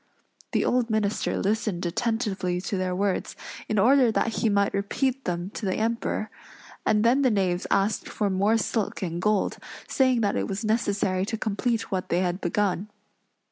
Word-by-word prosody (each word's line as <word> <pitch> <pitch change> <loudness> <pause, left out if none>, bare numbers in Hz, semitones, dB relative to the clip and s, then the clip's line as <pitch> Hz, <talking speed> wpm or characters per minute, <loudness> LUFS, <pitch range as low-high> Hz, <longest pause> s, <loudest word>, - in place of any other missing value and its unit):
The - - +2
old 245 -2 +1
minister 215 -1 0
listened 205 -3 -1
attentively 195 -2 -1
to 195 +2 -3
their 185 -1 -1
words, 195 0 -1 0.3
in 215 - 0
order 250 +3 +5
that 225 0 0
he 225 - +2
might 200 -1 +2
repeat 255 +7 -1
them 175 +2 -2
to - - -8
the 190 -2 0
Emperor; 225 -1 -1 0.6
and 210 0 +3
then 250 +4 +4
the 260 - +4
knaves 185 -5 0
asked 200 +2 +1
for 210 - -1
more 200 +4 +3
silk 220 -3 -2
and 170 -1 -3
gold, 210 0 +1 0.3
saying 260 -3 +2
that 205 - +1
it - - -1
was 200 +3 -3
necessary 200 -4 +1
to 225 - -2
complete 225 +2 -1
what 185 -1 -2
they 175 - +2
had 180 +1 -1
begun. 195 +2 0
205 Hz, 175 wpm, -26 LUFS, 190-225 Hz, 0.6 s, order